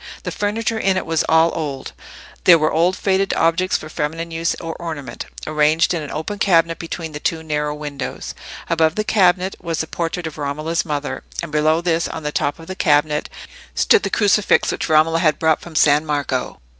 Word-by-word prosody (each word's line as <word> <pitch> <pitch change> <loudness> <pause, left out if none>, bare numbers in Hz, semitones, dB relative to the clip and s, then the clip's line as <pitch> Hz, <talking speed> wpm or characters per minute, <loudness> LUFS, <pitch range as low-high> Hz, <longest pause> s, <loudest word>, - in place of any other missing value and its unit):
The - - -4
furniture 220 +2 -1
in 190 -2 +1
it - - -2
was 165 -1 +1
all 160 +1 +5
old; 145 -5 -4 0.5
there 175 -2 +8
were 155 -1 +1
old 175 +4 +2
faded 195 0 +1
objects 165 +3 +2
for 155 - -9
feminine 160 +2 -4
use 165 0 -1
or 165 -1 -6
ornament, 160 -5 -6 0.2
arranged 155 +3 +2
in 170 - -2
an 150 - -7
open 180 +7 -4
cabinet 165 -4 +3
between 165 -1 -5
the 150 - -6
two 160 +1 -2
narrow 150 -1 -2
windows; 145 -2 -6 0.3
above 160 -1 +2
the 215 - 0
cabinet 190 -3 +2
was 165 -2 -3
the - - 0
portrait 165 +1 -3
of 160 -1 -6
Romola's 155 +3 -2
mother; 145 -2 -3 0.2
and 165 - -6
below 155 +2 +2
this, 170 -1 0
on 160 - -6
the 150 - -2
top 145 - -1
of 165 - -12
the 185 +2 -6
cabinet, 150 -3 +2 0.5
stood 445 - +4
the - - -2
crucifix 205 -1 +3
which - - -3
Romola 160 +1 +4
had 155 -4 +2
brought 160 -1 +2
from 170 -2 -11
San 150 0 +4
Marco. 145 -4 -2
165 Hz, 195 wpm, -20 LUFS, 150-175 Hz, 0.5 s, there